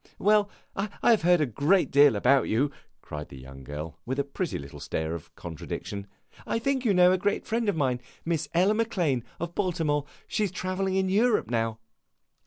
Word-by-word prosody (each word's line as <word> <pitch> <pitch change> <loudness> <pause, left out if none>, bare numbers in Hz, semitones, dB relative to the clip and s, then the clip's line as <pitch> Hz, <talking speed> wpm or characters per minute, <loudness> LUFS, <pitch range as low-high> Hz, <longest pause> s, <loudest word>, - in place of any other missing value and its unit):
"Well, 210 0 +3 0.3
I 200 +2 -2 0.2
have 225 - +4
heard 175 0 +4
a - - +3
great 145 - +2
deal 140 -3 +6
about 130 +6 +3
you!" 135 +6 +2 0.3
cried 75 0 -7
the 70 - -10
young 65 +1 -11
girl, 75 +4 -7
with 130 +2 -3
a 140 - +2
pretty 160 +5 -3
little 70 0 -9
stare 80 0 -3
of 85 -3 -8
contradiction. 100 +4 -6 0.4
"I - - -1
think 265 +2 0
you 230 - +3
know 180 -1 +6
a 185 - +2
great 200 +2 0
friend 230 -1 0
of 205 - 0
mine, 130 -4 0 0.2
Miss 165 -2 -1
Ella 185 +5 +4
Maclane, 180 - 0 0.2
of 170 0 -4
Baltimore. 160 -7 0 0.2
She 210 - 0
's - - -10
travelling 185 +1 -2
in 190 0 +2
Europe 210 - +2
now." 115 -1 0
160 Hz, 195 wpm, -27 LUFS, -, 0.4 s, deal